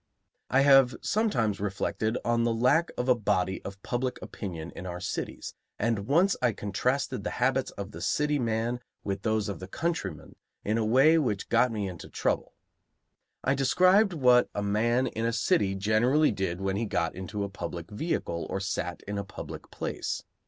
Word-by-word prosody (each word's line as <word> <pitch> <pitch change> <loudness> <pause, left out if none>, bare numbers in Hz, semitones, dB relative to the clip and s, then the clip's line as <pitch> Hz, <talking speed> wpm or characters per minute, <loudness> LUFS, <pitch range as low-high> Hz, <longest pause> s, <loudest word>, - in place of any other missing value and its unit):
I 130 - +4
have 135 -2 +6
sometimes 120 - +1
reflected 105 +3 -1
on 120 0 +2
the 115 -1 +2
lack 145 +9 +3
of 125 - -1
a 130 - +6
body 95 -5 0
of 100 0 -8
public 125 +1 -2
opinion 85 -5 -6
in 95 - -7
our 90 0 -5
cities, 95 - -4 0.2
and 110 -2 -1
once 175 +8 +4
I 120 -3 +3
contrasted 105 +7 -1
the - - -2
habits - - +1
of - - -5
the 80 - -9
city 150 +10 +1
man 115 +1 -1 0.2
with 95 -1 -3
those 110 -1 0
of 100 - -4
the 95 - -7
countryman 165 - -3 0.3
in 110 +2 +1
a - - +1
way 135 +9 +5
which 105 -9 -1
got 120 +1 +4
me 105 -3 -2
into 90 -3 -8
trouble. - - -1 0.9
I 135 - +2
described 185 +9 +4
what 125 -5 +4
a 100 - -1
man 115 +5 +2
in 115 -2 -3
a 115 - +2
city 105 -3 +1
generally 115 +10 +3
did 95 -3 -2
when 95 0 -1
he 115 - -1
got 85 - 0
into 100 +3 -4
a - - -1
public 85 -3 -6
vehicle 105 - -2
or - - -2
sat 95 -3 -3
in 100 0 -4
a - - -3
public 100 - -9
place. - - -4
110 Hz, 180 wpm, -28 LUFS, 100-130 Hz, 0.9 s, have